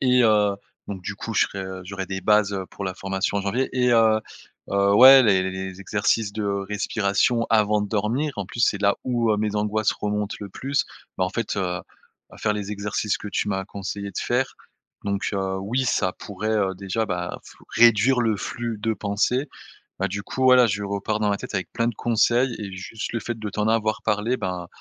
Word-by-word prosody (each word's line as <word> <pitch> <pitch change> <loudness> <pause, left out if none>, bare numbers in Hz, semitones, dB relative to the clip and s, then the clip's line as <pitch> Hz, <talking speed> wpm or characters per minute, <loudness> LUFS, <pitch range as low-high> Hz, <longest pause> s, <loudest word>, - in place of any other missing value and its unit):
et, 125 -1 +4
heu, 105 -2 +3 0.3
donc, 100 -2 -5
du 100 - -4
coup, 115 - -5
je - - +4
serai, 95 -1 -6
heu, 95 0 -6
j'aurai 95 0 -5
des 95 -1 -4
bases 105 -1 +3
heu 95 -1 -4
pour 100 - -6
la 95 -1 -3
formation 95 +1 -2
en 100 - -3
janvier 120 +7 0
et, 125 -1 +2
heu 110 -1 +4 0.5
heu, 100 0 +3
ouais 130 +3 +10
les 95 -5 +4
les 95 - -2
les 95 0 -4
les 95 +1 -12
exercices 105 +1 0
de 110 - -3
respiration 100 +3 0
avant 105 -1 +3
de 105 - -4
dormir. 115 +8 0
En 100 -3 -3
plus, 115 - -7
c'est 100 -3 +2
là, 100 0 +3
où, 120 -3 +1
heu, - - +1
mes 105 0 -1
angoisses 105 +1 +1
remontent 105 0 -3
le 100 - -6
plus, 140 +7 -1 0.3
bah, 95 - +2
en 90 - -2
fait, 115 -3 -3
heu - - 0 0.2
heu, - - -10 0.6
faire 105 - +1
les 105 0 -4
exercices 105 +1 -1
que 105 - -7
tu 105 - -1
m'as 95 -1 -1
conseillés 100 0 -5
de - - -4
faire. 125 +2 0 0.5
Donc, 100 0 -1
heu, 95 -1 -1
oui, 125 +7 -1
ça 95 -6 +1
pourrait, 105 +3 -5
heu, 100 -3 +1
déjà, 100 +4 -2
bah, 90 -2 -3
flou - - -16
réduire 120 +2 +5
le 110 -3 +1
flux 115 +2 -4
de 110 +2 0
pensées. 115 +8 0 0.5
Bah, - - +1
du 100 +2 -4
coup, 130 - -3
voilà, 130 -1 +7
je 100 0 -2
repars 100 +2 -2
dans 105 -1 +1
ma 100 - +1
tête - - -6
avec 95 - -3
plein 115 0 +1
de 120 - -2
conseils 120 +2 +2
et 100 -2 -5
juste 100 +3 -6
le 115 - -1
fait 120 -1 -4
de 105 -1 -4
t'en 105 +2 -1
avoir 110 -1 +1
parlé, 110 +4 0
ben, 90 -3 -4
105 Hz, 225 wpm, -24 LUFS, 100-115 Hz, 0.6 s, ouais